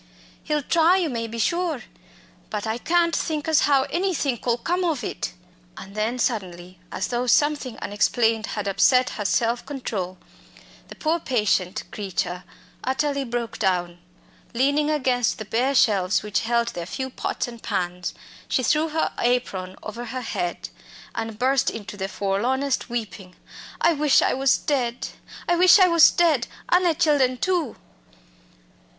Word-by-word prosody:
"He'll 300 -2 -1
try, 335 +5 +4
you 340 -6 0
may 230 -1 -3
be 230 +1 -7
sure. 340 +1 0 0.7
But 210 0 -3
I 220 +2 -2
can't 335 +3 +2
think 305 -2 -2
as 315 -2 +3
how 275 -2 +4
anythink 310 - -1
'ull 235 0 +2
come 355 +8 -1
ov 315 -8 -1
it." - - -4 0.4
And 195 - -10
then 215 +4 -1
suddenly, 185 -7 -3
as 190 - -3
though 245 +1 -1
something 290 -1 +2
unexplained 225 +2 +1
had 205 -1 -2
upset 250 +6 +3
her 210 - -5
self 235 +3 +1
control, 200 -10 -4 0.7
the - - -11
poor 325 +2 0
patient 210 - 0
creature 185 -3 -3 0.4
utterly 280 +2 0
broke 240 -2 -4
down. 175 -2 0 0.6
Leaning 285 +4 +2
against 255 -6 +1
the 215 - -6
bare 250 +6 0
shelves 200 -6 +3
which 210 -1 0
held 235 +1 0
their 170 -1 -6
few 265 +5 -4
pots - - -3
and 235 -1 -10
pans, 180 0 -3 0.3
she 255 - 0
threw 305 +6 +2
her 315 +1 0
apron 195 -7 -1
over 230 +3 -6
her 255 +2 -5
head 175 -7 -3 0.4
and 225 -1 -4
burst 260 +2 +2
into 210 -2 -7
the 190 -1 -3
forlornest 240 +9 -1
weeping. 210 -6 -5 0.4
"I 340 - +4
wish 300 -2 +4
I - - +2
was 265 0 +3
dead; 245 -4 -2 0.4
I 350 - +3
wish 365 +3 +8
I 375 -2 +6
was 335 -2 +7
dead, 315 -8 +2 0.2
an' 360 - +5
the 335 -2 +3
chillen 285 -6 +2
too!" 350 -9 0
245 Hz, 155 wpm, -24 LUFS, 210-295 Hz, 0.7 s, wish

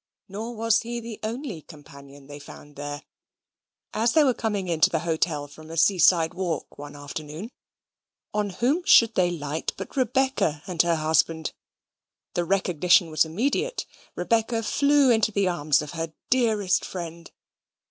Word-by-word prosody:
Nor 220 +5 -6
was 225 0 +2
he 240 +1 -5
the 230 -2 -8
only 225 - -5
companion 140 -3 -14
they 145 +1 -10
found 145 0 -13
there. 145 0 -6 0.9
As 230 +2 +1
they 315 - +5
were 265 -3 +3
coming 210 -5 -2
into 165 -3 +3
the 160 - -1
hotel 160 -3 -1
from 155 +2 -14
a 165 - -7
sea 180 +3 +3
side 165 -1 +4
walk 175 -6 -4
one 145 0 -9
afternoon, 150 - -7 0.8
on 210 -1 0
whom 255 - 0
should 230 - +6
they 180 -4 +2
light 155 -2 -3
but - - -8
Rebecca 260 - 0
and 180 -5 +1
her 170 -1 +2
husband. 160 0 +1 0.8
The 175 - -1
recognition 180 -2 +3
was 155 - +3
immediate. 275 - -1 0.3
Rebecca 225 +4 0
flew 280 +3 +3
into 220 -2 +3
the 200 -2 +1
arms 150 -4 +1
of 150 - -8
her 165 -1 -5 0.2
dearest 215 -7 +2
friend. 170 -2 -7
180 Hz, 155 wpm, -25 LUFS, 155-225 Hz, 0.9 s, should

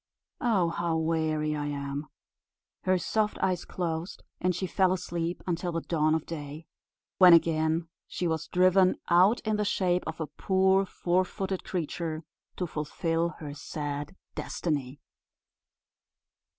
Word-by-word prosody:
Oh, 200 -8 +2
how 165 -1 -1
weary 160 -1 0
I 145 -1 -2
am!" 140 +1 -4 0.8
Her 185 0 +4
soft 210 +4 0
eyes 185 -2 0
closed, 170 0 -4 0.2
and 180 0 +1
she 185 - -2
fell 185 +1 +2
asleep 175 -1 -3
until 175 0 -1
the 165 0 -2
dawn 155 -2 +2
of 160 - -2
day, 150 0 -7 0.5
when 180 -2 +10
again 160 0 +3 0.2
she 180 - -2
was 160 -1 -2
driven 185 +1 +4
out 185 +7 +5
in 215 -1 0
the 210 - +1
shape 180 -3 +1
of 160 0 -5
a 160 - -1
poor 190 +4 +2
four 180 +1 +1
footed 190 +1 -4
creature, 165 -2 -3 0.3
to 180 - -1
fulfil 165 +2 -1
her 150 -3 -7
sad 145 +1 -5 0.2
destiny. 145 -4 -3
170 Hz, 140 wpm, -28 LUFS, 155-185 Hz, 0.8 s, when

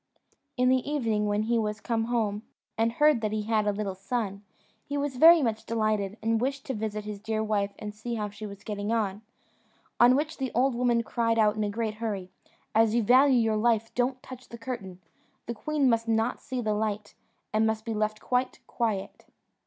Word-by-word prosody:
In 250 0 +3
the 260 - +5
evening, 225 -7 0
when 205 +1 +1
he 230 +1 +1
was 210 -1 -2
come 225 -1 -1
home, 220 -3 -1 0.3
and 225 +1 +1
heard 295 -2 +4
that 215 -1 -1
he 215 -1 -1
had 215 -1 +1
a - - +3
little 200 -1 -3
son, 200 +1 -3 0.4
he 285 - -4
was 285 -2 -2
very 325 +2 +8
much 220 -2 -1
delighted, 215 -2 -1
and 225 0 +1
wished 275 +2 -2
to 265 - -3
visit 215 -2 -4
his 210 -1 -6
dear 220 +1 -2
wife 205 -2 -1
and 210 -1 -6
see 235 +3 -5
how 210 -2 -3
she 215 +1 -7
was 200 0 -11
getting 205 0 -3
on; 210 -3 -1 0.8
on 245 +2 +7
which 310 +3 -2
the 265 -3 -2
old 260 +2 +3
woman 240 -1 +1
cried 230 -1 0
out 210 -2 +4
in 215 - -1
a 205 - -1
great 220 +1 -2
hurry, 195 -5 -3 0.4
"As 225 0 +4
you 235 - +2
value 255 +4 +5
your 225 -2 +2
life, 225 0 +1
don't 250 +1 -1
touch 255 -1 -11
the 235 - -8
curtain; 225 -7 -6 0.5
the 235 - -3
queen 290 +5 0
must 230 -1 +2
not 225 +2 0
see 255 -1 -4
the 215 -2 0
light, 210 -1 -2 0.4
and 220 +1 +3
must 220 0 -2
be 225 - -2
left 215 0 -1
quite 250 0 -1
quiet." 220 -5 -3
225 Hz, 210 wpm, -28 LUFS, 210-245 Hz, 0.8 s, very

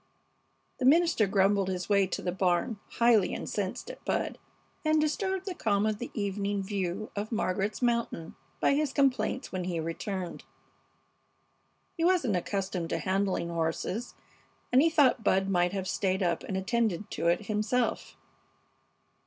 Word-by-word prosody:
The 255 - 0
minister 320 -6 +4
grumbled 195 0 +3
his 180 -1 -3
way 200 -2 +3
to - - -4
the 180 - 0
barn, 185 +4 0
highly 230 -5 +4
incensed 200 - -3
at - - -14
Bud, - - -1 0.4
and 310 0 +3
disturbed 380 +5 -1
the 380 - -3
calm 205 - +1
of 215 -1 0
the 245 - -5
evening 200 -1 -1
view 195 +1 -3
of 205 +2 -3
Margaret's 205 +1 -1
mountain 235 -9 -1 0.2
by - - +3
his 290 -1 0
complaints 270 -1 +1
when 185 -1 -3
he 175 -2 -2
returned. 175 +2 -4 1.5
He 330 - -2
wasn't 335 - +3
accustomed 185 -2 -2
to - - 0
handling 185 +1 0
horses, 170 +7 -2 0.6
and 255 +2 +6
he 330 - +4
thought 280 -7 +3
Bud 195 -1 +2
might 180 -2 +2
have 190 -1 -3
stayed 190 0 0
up 170 -2 0
and 190 - -3
attended 210 -1 -1
to - - -1
it 175 +5 +2
himself. 215 +4 -1
200 Hz, 150 wpm, -29 LUFS, 185-240 Hz, 1.5 s, and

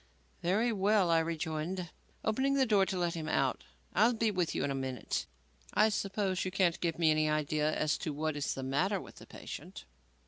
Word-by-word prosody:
"Very 215 +7 +2
well," 200 -2 +3
I 165 - +5
rejoined, 165 +2 -3 0.3
opening 265 +5 +2
the 270 -1 +4
door 205 -5 +3
to 185 - -2
let 175 -1 0
him 160 -2 -4
out, 135 -3 0 0.3
"I'll 225 +6 +4
be 225 -1 +1
with 180 -4 -1
you - - 0
in 140 - 0
a - - 0
minute. 130 -3 -3 0.5
I 220 - +5
suppose 195 -2 -1
you 185 - -1
can't 185 -2 +1
give 170 -2 0
me 165 -2 +4
any 155 0 +2
idea 150 0 +1
as 155 -1 0
to 155 - -3
what 155 +1 -2
is 145 -1 -2
the 135 - -5
matter 180 +10 +1
with - - -12
the - - -12
patient?" - - -9
170 Hz, 205 wpm, -32 LUFS, 155-200 Hz, 0.5 s, I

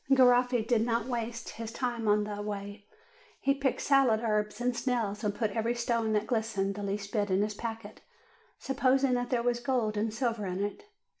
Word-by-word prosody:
Garoffi 250 -2 +5
did 230 -1 +2
not 230 -1 0
waste 235 -2 -4
his 225 -1 -6
time 240 -2 -2
on 210 0 +4
the 205 0 -4
way; 205 0 -6 0.5
he 275 - +2
picked 275 -1 -1
salad 270 -6 +4
herbs 210 -1 0
and 245 0 0
snails, 230 -5 -1
and 205 -1 0
put 220 -3 -1
every 230 +3 0
stone 235 -2 0
that 210 0 +1
glistened 220 -5 -1
the 205 - -6
least 200 0 -3
bit 205 -2 +1
into 190 +2 +2
his 210 0 -2
packet, 225 -1 -6 0.6
supposing 270 0 +2
that 245 0 -1
there 240 -2 +1
was 240 0 +1
gold 240 -4 0
and 215 +1 0
silver 230 -3 -1
in 185 +2 -2
it. 205 - -5
225 Hz, 195 wpm, -30 LUFS, 210-245 Hz, 0.6 s, Garoffi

